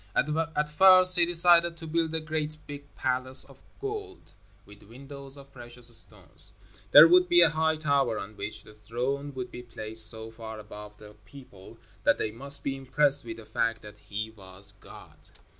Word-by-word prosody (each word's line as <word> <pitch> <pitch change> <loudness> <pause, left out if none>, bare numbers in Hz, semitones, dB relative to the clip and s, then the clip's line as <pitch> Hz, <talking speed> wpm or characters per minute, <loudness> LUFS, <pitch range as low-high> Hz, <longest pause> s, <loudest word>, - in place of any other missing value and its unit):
At 150 0 -2
first 185 +3 +6
he 170 - +2
decided 170 -1 +4
to 165 - -11
build 160 0 -3
a - - -2
great 155 -1 -6
big 145 0 -12
palace 130 +1 +3
of 135 -1 -18 0.2
gold, 410 -2 -9 0.3
with 105 0 -18
windows 135 +4 -14
of 140 0 -17
precious 120 -1 -2
stones. - - -3 0.4
There 150 +3 +8
would 180 +1 +3
be 175 0 +4
a 165 -3 +4
high 160 0 -1
tower 140 -6 -1
on 105 +2 -9
which 105 - -8
the 105 - -17
throne 125 +7 -6
would 125 -1 -7
be - - -10
placed 110 -2 -5
so 110 0 -8
far 110 -1 -11
above 105 0 -13
the 105 0 -16
people 100 -5 -16 0.3
that - - +1
they 110 - -4
must 140 +5 +4
be 135 - -4
impressed 135 +1 +2
with 115 -1 -9
the 110 - -14
fact 115 0 -3
that 105 0 -14
he 110 +2 -6
was 95 -1 -15
God. - - -17
135 Hz, 180 wpm, -26 LUFS, 110-155 Hz, 0.4 s, There